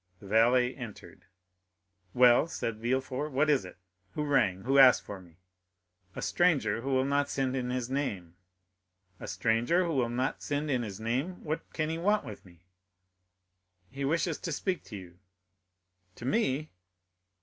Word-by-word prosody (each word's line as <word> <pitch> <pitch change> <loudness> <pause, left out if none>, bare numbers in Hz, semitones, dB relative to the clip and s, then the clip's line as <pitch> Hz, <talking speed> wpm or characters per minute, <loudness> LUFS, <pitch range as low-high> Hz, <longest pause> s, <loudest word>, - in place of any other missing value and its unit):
The - - -14
valet 120 +5 +3
entered. 120 -5 -10 0.9
"Well," 125 +4 +6
said 115 -9 -4
Villefort, 130 +4 -2
"what 150 +3 +2
is 140 - +1
it?—Who 90 +6 -9
rang?—Who 130 -2 +2
asked 130 -2 +7
for 100 -2 -8
me?" 85 -3 -19 0.8
"A - - -5
stranger 140 -12 +1
who 135 - -4
will 130 -1 +2
not 140 +1 +1
send 135 -1 -1
in 125 -1 -2
his 125 -1 -2
name." 105 -11 -3 0.9
"A - - -8
stranger 120 +11 +1
who 165 - -2
will 125 -4 +1
not 125 +3 -2
send 145 +1 -2
in 125 -2 +1
his 105 -3 -6
name! 130 +11 -3
What 155 +1 -4
can 155 -1 -2
he 165 - -3
want 205 +4 +1
with 105 - -9
me?" 85 -2 -19 1.3
"He 140 +1 -5
wishes 165 +3 0
to 165 - -5
speak 185 +4 -2
to 105 - -8
you." 90 -2 -13 1.0
"To - - -9
me?" 150 - 0
130 Hz, 155 wpm, -29 LUFS, 110-145 Hz, 1.3 s, asked